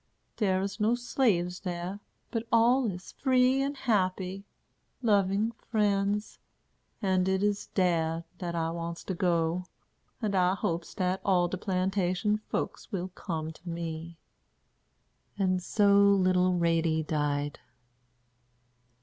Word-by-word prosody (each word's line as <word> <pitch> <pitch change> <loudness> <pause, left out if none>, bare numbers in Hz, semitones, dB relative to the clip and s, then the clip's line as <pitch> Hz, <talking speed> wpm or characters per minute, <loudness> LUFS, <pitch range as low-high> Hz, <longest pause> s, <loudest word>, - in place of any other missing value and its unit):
Dere 190 -4 +1
is 200 +3 -4
no 220 +3 +3
slaves 205 -8 0
dar, 180 +1 -4 0.3
but 230 -1 -3
all 235 +2 +4
is 180 -1 -7
free 260 0 +3
and 280 +1 -2
happy, 195 -4 -1 0.6
loving 205 0 +2
friends; 210 -2 -1 0.6
and 185 -1 +2
it 190 +1 +1
is 205 0 0
dar 165 -3 +1 0.2
dat 175 -2 -3
I 165 -1 0
wants 170 0 -5
to 190 - -3
go; 170 0 0 0.5
and 215 -4 -1
I 185 0 +3
hopes 170 -2 -3
dat 185 +1 0
all 180 -3 +3
de 185 - -4
plantation 190 +1 0
folks - - -3
will 185 -2 -3
come 160 -4 -4
to 170 +2 -11
me." 165 0 -5 1.2
And 185 -2 +1
so 200 +2 +3
little 185 -2 +4
Ratie 165 -2 +2
died. 145 -2 -1
185 Hz, 125 wpm, -29 LUFS, 170-205 Hz, 1.2 s, all